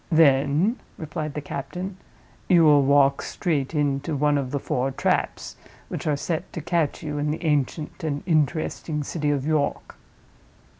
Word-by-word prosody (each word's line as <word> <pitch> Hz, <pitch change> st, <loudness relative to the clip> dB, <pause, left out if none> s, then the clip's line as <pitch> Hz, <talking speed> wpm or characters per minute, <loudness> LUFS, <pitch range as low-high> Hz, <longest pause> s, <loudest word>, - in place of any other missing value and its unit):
"Then," 155 Hz, -, +4 dB, 0.2 s
replied 155 Hz, -2 st, -5 dB
the 150 Hz, -, -2 dB
captain, 180 Hz, +8 st, -5 dB, 0.5 s
"you 175 Hz, -3 st, +6 dB
will 150 Hz, -2 st, +6 dB
walk 140 Hz, 0 st, +4 dB
straight 155 Hz, -4 st, -2 dB
into 145 Hz, +1 st, 0 dB
one 145 Hz, +1 st, +2 dB
of 140 Hz, -3 st, -1 dB
the 140 Hz, -, -1 dB
four 130 Hz, -1 st, -1 dB
traps 135 Hz, -, -1 dB, 0.3 s
which -, -, -4 dB
are 150 Hz, -2 st, +2 dB
set 165 Hz, +4 st, -3 dB
to -, -, -4 dB
catch 165 Hz, -1 st, -1 dB
you 150 Hz, -1 st, -3 dB
in 150 Hz, +1 st, 0 dB
the 155 Hz, +3 st, -3 dB
ancient 150 Hz, +1 st, -1 dB
and 145 Hz, -2 st, -2 dB
interesting 155 Hz, -1 st, 0 dB
city 150 Hz, 0 st, -2 dB
of 140 Hz, -2 st, 0 dB
York. 155 Hz, -2 st, -1 dB
150 Hz, 155 wpm, -24 LUFS, 140-160 Hz, 0.5 s, you